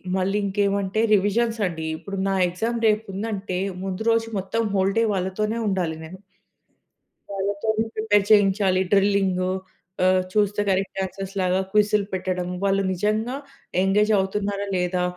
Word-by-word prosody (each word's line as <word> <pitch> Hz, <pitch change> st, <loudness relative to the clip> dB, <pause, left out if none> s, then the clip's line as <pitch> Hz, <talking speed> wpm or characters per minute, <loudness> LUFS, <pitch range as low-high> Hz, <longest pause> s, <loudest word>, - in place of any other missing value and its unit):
మళ్ళీ 195 Hz, +2 st, 0 dB
ఇంకేమంటే 200 Hz, +1 st, 0 dB
రివిజన్స్ 225 Hz, +3 st, +2 dB
అండీ. 160 Hz, -2 st, -5 dB
ఇప్పుడు 195 Hz, +4 st, -7 dB
నా 195 Hz, -, +1 dB
ఎగ్జామ్ 225 Hz, +7 st, -2 dB
రేపుందంటే, 205 Hz, -2 st, -2 dB, 0.2 s
ముందు 190 Hz, +2 st, -4 dB
రోజు 225 Hz, 0 st, +2 dB
మొత్తం 195 Hz, +5 st, -2 dB
హోల్ 195 Hz, 0 st, +2 dB
డే -, -, +4 dB
వాళ్ళతోనే 205 Hz, +4 st, -1 dB
ఉండాలి 180 Hz, -5 st, -1 dB
నేను. 180 Hz, +4 st, -10 dB, 1.1 s
వాళ్ళతోనే 200 Hz, +3 st, -1 dB
ప్రిపేర్ 205 Hz, -2 st, +3 dB
చేయించాలి. 195 Hz, -2 st, +4 dB
డ్రిల్లింగూ 195 Hz, -2 st, +2 dB, 0.6 s
ఆహ్, 185 Hz, 0 st, +4 dB
చూస్తే 205 Hz, -1 st, +2 dB
డైరెక్ట్ 195 Hz, 0 st, -1 dB
ఆన్సర్స్‌లాగా 190 Hz, -1 st, -2 dB
క్విజ్‌లు 210 Hz, -1 st, +3 dB
పెట్టడం. 185 Hz, -1 st, -2 dB, 0.2 s
వాళ్ళు 195 Hz, 0 st, +2 dB
నిజంగా 215 Hz, +6 st, -1 dB, 0.5 s
ఎంగేజ్ 210 Hz, +3 st, +3 dB
అవుతున్నారా, 200 Hz, +1 st, -2 dB
లేదా 180 Hz, 0 st, 0 dB
195 Hz, 125 wpm, -23 LUFS, 190-210 Hz, 1.1 s, డే